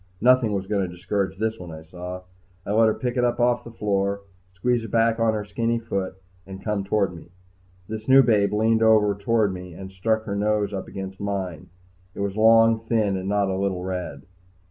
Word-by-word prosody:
Nothing 125 -1 +4
was 95 -1 -2
going 100 0 0
to 90 -2 -3
discourage 95 +1 -2
this 110 +2 -2
one, 90 -1 -8
I 80 0 -9
saw. 90 +2 -8 0.4
I - - -3
let 110 +1 +4
her 110 - +3
pick 125 0 -3
it 125 - +2
off 120 0 +2
the 120 - -9
floor, 100 -3 -1 0.3
squeeze 120 +5 0
it 115 - -7
back 115 +1 +2
on 115 -1 +2
her 105 -1 -3
skinny 115 +3 -1
foot, 100 -5 -3 0.3
and 95 0 -9
come 105 -2 -1
toward 100 -2 0
me. 85 - -13 0.6
This 110 0 -6
new 135 +1 +8
babe 105 -4 +3
leaned 110 +2 +2
over 110 -2 +5
toward 105 0 +1
me 90 -2 -9
and 95 +1 -9
stuck 110 +4 0
her 100 -2 -4
nose 105 0 0
up 95 - -4
against 95 0 -7
mine. 95 -6 -4 0.5
It - - -5
was 100 -1 -2
long, 115 +1 +5
thin, 110 -3 0
and 95 +1 -3
not 100 -1 +1
a - - -1
little 95 -2 -1
red. 90 -1 -5
105 Hz, 210 wpm, -24 LUFS, 95-115 Hz, 0.6 s, new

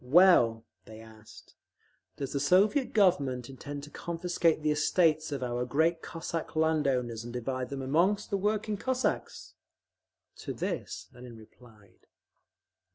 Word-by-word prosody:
"Well," 125 -7 +5 0.2
they 110 0 -12
asked, 110 -1 -15 0.6
"does 140 -2 -4
the 140 - 0
Soviet 200 - +3
Government 140 - +2
intend 140 +2 -8
to 145 - -10
confiscate 170 -1 -1
the 155 - +2
estates 155 +1 +2
of 140 -3 -3
our 120 0 -2
great 160 +6 +1
Cossack 165 0 -5
land 155 -2 +2
owners 120 -4 -1
and 120 - -7
divide 125 +1 -3
them 135 -1 -5
among 170 +10 +2
the - - +1
working 210 +1 -1
Cossacks?" 260 +4 -2 0.8
To - - -6
this - - -4
Lenin 125 -2 -11
replied. 110 -3 -19
145 Hz, 135 wpm, -29 LUFS, 125-170 Hz, 0.8 s, Well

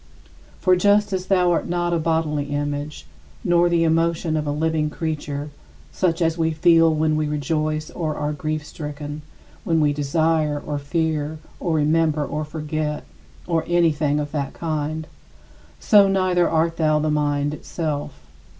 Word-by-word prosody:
For 185 -1 +3
just 205 +2 +3
as 185 0 -2
thou 180 -2 +3
art 170 - 0
not 175 0 0
a 170 - +1
bodily 160 -2 0
image, 145 +1 -4 0.4
nor 175 0 +3
the 170 -1 +2
emotion 165 0 +1
of 155 -1 -1
a - - 0
living 155 0 0
creature 150 -2 -4 0.4
(such 175 -2 0
as 165 +1 0
we 160 0 +2
feel 165 +1 +4
when 155 0 +1
we 155 0 0
rejoice 155 +1 -2
or 155 -3 -3
are 150 0 -2
grief 155 0 -3
stricken, 150 0 -7 0.4
when 165 -7 +1
we 150 -1 +3
desire, 150 +1 +1
or 145 0 -4
fear, 155 0 -1 0.2
or 170 -3 -1
remember, 155 0 +2
or 155 - -3
forget, 150 0 -3 0.4
or 165 -2 0
anything 155 -4 +2
of 145 -1 -4
that 145 -3 -3
kind), 155 -1 -3 0.7
so 205 -2 +6
neither 185 -2 +2
art 165 +1 +1
thou 155 -2 +3
the 155 0 0
mind 145 -1 0
itself. 145 - -5
155 Hz, 155 wpm, -22 LUFS, 150-165 Hz, 0.7 s, so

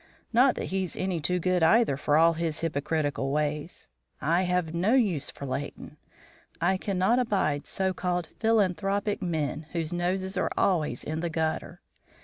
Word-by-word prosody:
Not 250 +2 +5
that - - -3
he's 190 -2 -1
any 185 -2 -1
too 180 +4 0
good 180 0 +1
either 190 - +4
for 145 +2 +1
all 165 +1 +5
his 165 -2 -3
hypocritical 145 -3 -1
ways. 150 +2 -2 0.3
I 165 +5 +2
have 180 -3 0
no 190 +9 +2
use 185 - +1
for 140 - -8
Leighton. 145 +2 -5 0.6
I 185 +3 +2
cannot 195 +5 +1
abide 190 - 0
so 190 -1 0
called 180 -1 -2
philanthropic 205 -2 +1
men 155 -3 -2
whose 165 -1 -2
noses 185 +2 -1
are - - +1
always 170 -6 +1
in 155 +1 -3
the 170 +1 -2
gutter. 160 0 -2
175 Hz, 155 wpm, -27 LUFS, 155-190 Hz, 0.6 s, Not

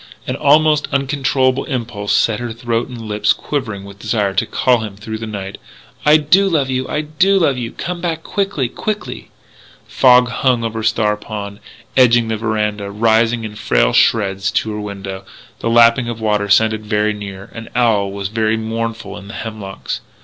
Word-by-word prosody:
An - - -2
almost 150 +1 +3
uncontrollable 135 -1 +1
impulse 115 -6 -3
set 110 -2 +2
her 120 -1 -4
throat 115 0 -2
and 125 -2 -9
lips 105 -1 +1
quivering 115 -9 -4
with 100 0 -12
desire 105 -2 0
to - - 0
call 125 -2 +2
to 110 - -3
him 100 - -12
through 110 +2 -6
the 115 - -5
night, 100 -2 -6 0.5
"I 150 +1 +8
do 180 +6 +3
love 140 -6 +1
you! 130 0 -1
I 150 - -1
do 180 +6 +2
love 160 -7 +2
you! 120 -2 -4
Come 175 0 -5
back 165 -2 -2
quickly, 195 -10 -1
quickly! 210 - -5 0.3
" - - -24 0.2
Fog 125 -1 +5
hung 120 0 +1
over 115 0 -3
Star 110 -1 +1
Pond, 105 -1 -7 0.4
edging 120 -3 +4
the 110 - -1
veranda, 105 -2 -2
rising 115 +2 +2
in 110 -1 -6
frail 105 - +1
shreds 100 -3 +2
to 110 - 0
her 105 0 -4
window. 100 -2 -6 0.4
The 115 - -2
lapping 115 +1 +5
of 120 - -4
the 110 - -10
water 105 -1 0
sounded 110 +1 +3
very 105 0 0
near. 100 -2 -8
An 115 -1 -8
owl 110 -5 +2
was 100 0 -4
very 110 0 0
mournful 115 -1 -4
in 100 - -13
the 105 - -9
hemlocks. 105 -4 -6
115 Hz, 185 wpm, -17 LUFS, 105-130 Hz, 0.5 s, I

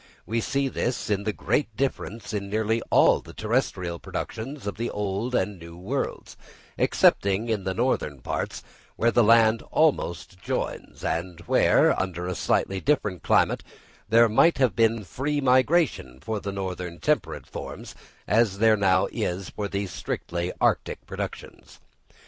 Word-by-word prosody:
We 115 +1 -1
see 140 +4 0
this 120 -4 -2
in 100 0 0
the 110 - +1
great 110 +1 -1
difference 115 -4 -3
in 100 -1 -3
nearly 110 +2 0
all - - +5
the - - -13
terrestrial 100 -7 -1
productions 130 +4 -6
of 100 - -4
the 115 - -2
New 105 +1 -2
and 95 -3 -2
Old 85 +1 -11
Worlds, 135 +7 -3 0.4
excepting 100 +4 +2
in 105 -4 -1
the 95 0 -2
northern 115 - 0
parts, - - -4 0.3
where 115 - +2
the 120 - +4
land 115 0 +5
almost 95 - 0
joins, - - -4
and 85 0 -3
where, 85 - +4
under 90 -2 -4
a 90 - -2
slightly 95 +3 0
different 105 - 0
climate, - - +2 0.5
there 115 +1 +6
might 140 +10 +4
have 130 -9 +2
been 115 -1 +2
free 145 +9 -2
migration 130 - +2
for 110 +8 -3
the 100 - -4
northern 90 -3 -5
temperate - - -1
forms, - - -8 0.3
as 105 -1 +2
there 110 +1 +5
now 95 -2 +3
is 90 +1 -3
for 105 - -3
the 100 0 -2
strictly 90 -1 -4
arctic - - 0
productions. - - -7
105 Hz, 150 wpm, -25 LUFS, 95-115 Hz, 0.5 s, there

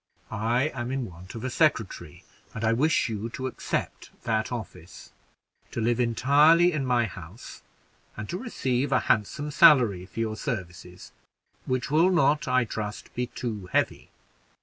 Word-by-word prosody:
I 120 +7 0
am 120 -4 -5
in 135 -2 -2
want 90 +1 -11
of 115 - -7
a 130 - -3
secretary, 135 - 0 0.3
and 110 - -5
I 110 +1 +3
wish 150 +7 +2
you 110 0 -4
to 130 +2 -6
accept 130 - -4
that 110 0 -1
office, 110 -8 -8 0.6
to - - -5
live 115 +1 +1
entirely 145 +9 +4
in 145 -5 -2
my 120 -2 +2
house, 95 +2 -10 0.6
and 105 0 -5
to 180 - -3
receive 135 - -2
a - - +3
handsome 145 +8 0
salary 125 - +5
for 115 - -9
your 110 -1 -1
services, 90 -7 -6 0.6
which 130 0 -2
will 165 +5 +4
not, 150 -5 +2
I 125 -1 +2
trust, 105 -1 -6
be 125 0 -2
too 110 -8 -5
heavy. - - 0
120 Hz, 155 wpm, -26 LUFS, 110-140 Hz, 0.6 s, salary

